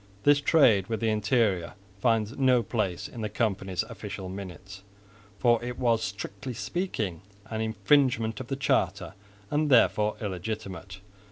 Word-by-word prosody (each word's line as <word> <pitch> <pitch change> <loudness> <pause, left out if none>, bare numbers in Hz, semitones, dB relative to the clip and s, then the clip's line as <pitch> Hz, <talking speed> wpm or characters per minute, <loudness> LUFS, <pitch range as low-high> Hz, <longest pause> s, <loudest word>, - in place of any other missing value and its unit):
This 145 0 +5
trade 120 - +4
with 110 - -2
the 115 -1 +1
interior 105 -4 +1 0.3
finds 115 +1 +1
no 130 -3 +3
place 100 -5 -2
in 120 - -8
the 105 - -2
company's 100 -3 -1
official 105 -4 -7
minutes, 95 0 -8 0.6
for 120 0 +3
it 125 0 -5
was 115 -3 +2
strictly 100 +3 -5
speaking 110 - -3 0.3
an 110 0 -2
infringement 110 +1 +2
of 130 - -6
the 135 - -2
charter, 95 -8 0 0.4
and 150 +1 +1
therefore 105 -4 +4
illegitimate. 95 -2 -5
110 Hz, 140 wpm, -27 LUFS, 95-120 Hz, 0.6 s, This